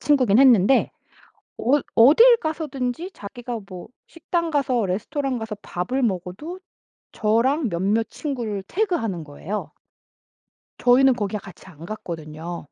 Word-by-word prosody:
친구긴 255 -8 +3
했는데 255 -2 +5 0.7
어이 275 +6 +2
어딜 450 - +7
가서든지 310 - -3
자기가 235 +3 -7
뭐 180 -2 -9 0.2
식당 335 0 -3
가서 255 -6 +1
레스토랑 260 - -2
가서 220 -1 -5
밥을 250 +9 -2
먹어도 200 - -3 0.5
저랑 240 +6 +1
몇몇 200 +6 0
친구를 235 -9 -4
태그하는 330 - -1
거예요. 155 +8 -6 1.1
저희는 260 +2 +5
거기에 210 -2 -3
같이 195 -3 -14
안 165 -3 -12
갔거든요. 170 -3 -7
235 Hz, 285 characters per minute, -23 LUFS, 195-285 Hz, 1.1 s, 어딜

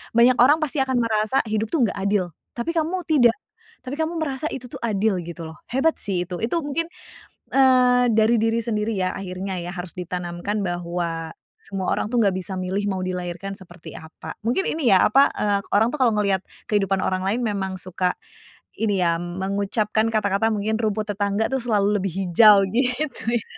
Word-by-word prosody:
banyak 245 +2 +5
orang 285 +6 +6
pasti 295 -1 -2
akan 260 -1 +1
merasa 220 +3 +1
hidup 220 0 -1
tuh, 265 +1 +1
nggak 205 - 0
adil, 195 -3 0 0.2
tapi 245 +8 -2
kamu 335 +3 -1
tidak. 245 -7 +4 0.5
Tapi 270 +4 -6
kamu 320 +1 -1
merasa 280 0 -3
itu 250 -2 -7
tuh - - -7
adil 215 -3 0
gitu 170 0 -8
loh, 160 -1 -8
hebat 270 +6 +1
sih, 190 -4 -1
itu 180 - -4
itu 225 - -2
mungkin, 290 +3 -1 0.7
eee, 250 -2 +5
dari 220 +1 +4
diri 225 +1 +1
sendiri 220 -2 -1
ya, 185 -1 0
akhirnya 185 -1 -5
ya, 175 - -6
harus 180 -1 -6
ditanamkan 180 +3 -3
bahwa 170 -2 -3 0.3
semua 195 -2 -2
orang 215 - -2
tuh 245 - -1
nggak 200 -4 +3
bisa 185 0 -4
milih 185 +2 -2
mau 185 -1 -2
dilahirkan 180 +1 -4
seperti 175 -3 -12
apa. 160 0 -9
Mungkin 245 - 0
ini 310 -7 0
ya, 190 -3 +6
apa, 270 +6 +5
eee, 205 -1 +1
orang 225 +5 +2
tuh 300 - -3
kalau 245 - +5
ngeliat 200 -3 +1 0.2
kehidupan 195 -2 +1
orang 185 0 0
lain 225 +6 -1
memang 195 -3 -2
suka, 185 0 -2 0.6
ini 205 -4 +1
ya, 170 0 +2
mengucapkan 200 +4 -1
kata-kata 215 0 +1
mungkin, 215 +1 -1
"Rumput 215 -1 -1
tetangga 205 +2 0
tuh 265 - 0
selalu 210 -3 +2
lebih 195 -2 -2
hijau," 200 +2 +6
gitu 250 +6 -1
ya? 230 - -1
210 Hz, 185 wpm, -23 LUFS, 185-240 Hz, 0.7 s, orang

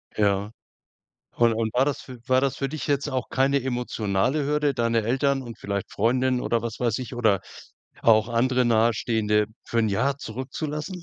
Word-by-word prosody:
Ja. 100 0 +1 0.8
Und 115 -1 +4
und 110 -1 -2
war 130 +2 +3
das 145 -1 -2
fü 125 -2 -10
war 130 0 +4
das 135 0 0
für 135 - -1
dich 150 -1 -5
jetzt 140 0 0
auch 130 -2 -3
keine 135 +1 +2
emotionale 125 +1 -1
Hürde, 150 -1 +1
deine 115 -1 +1
Eltern 135 +4 +1
und 115 -2 -9
vielleicht 100 -1 -3
Freundin 125 +3 +1
oder, 115 -1 0
was 115 -2 -5
weiß 120 -3 +1
ich, 125 -1 -6
oder 110 -5 +2 0.6
auch 110 0 +5
andere 125 +2 +2
Nahestehende 110 -2 +2 0.2
für 115 - -2
1 110 - +3
Jahr 125 +7 +1
zurückzulassen? 150 - -5
120 Hz, 175 wpm, -25 LUFS, 110-135 Hz, 0.8 s, auch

